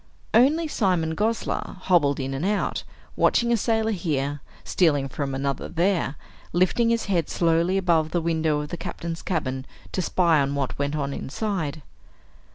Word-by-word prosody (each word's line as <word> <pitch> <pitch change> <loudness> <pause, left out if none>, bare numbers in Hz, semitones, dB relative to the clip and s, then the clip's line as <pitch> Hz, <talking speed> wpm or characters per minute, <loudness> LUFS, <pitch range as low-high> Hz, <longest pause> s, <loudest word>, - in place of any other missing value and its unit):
Only 290 +8 +4
Simon 180 - +1
Gosler 220 -1 -1
hobbled 155 -8 +3
in 135 0 -3
and 135 +4 -3
out, 205 +2 0 0.3
watching 235 0 +3
a - - +5
sailor 225 0 +1
here, 145 -7 -1 0.2
stealing 145 -6 +2
from 135 0 -3
another 135 0 -2
there, 175 -4 +1 0.4
lifting 185 +7 +3
his 230 0 +1
head 175 -5 0
slowly 170 +2 +2
above 170 -4 +2
the 175 - 0
window 160 -2 +1
of 150 - -6
the 175 - -4
Captain's 165 0 -5
cabin 135 -7 -2 0.3
to 185 - -1
spy 170 -3 +3
on 140 +1 0
what 140 -1 -2
went 140 +1 -1
on 140 -2 -2
inside. 160 -3 -3
165 Hz, 160 wpm, -25 LUFS, 145-195 Hz, 0.4 s, a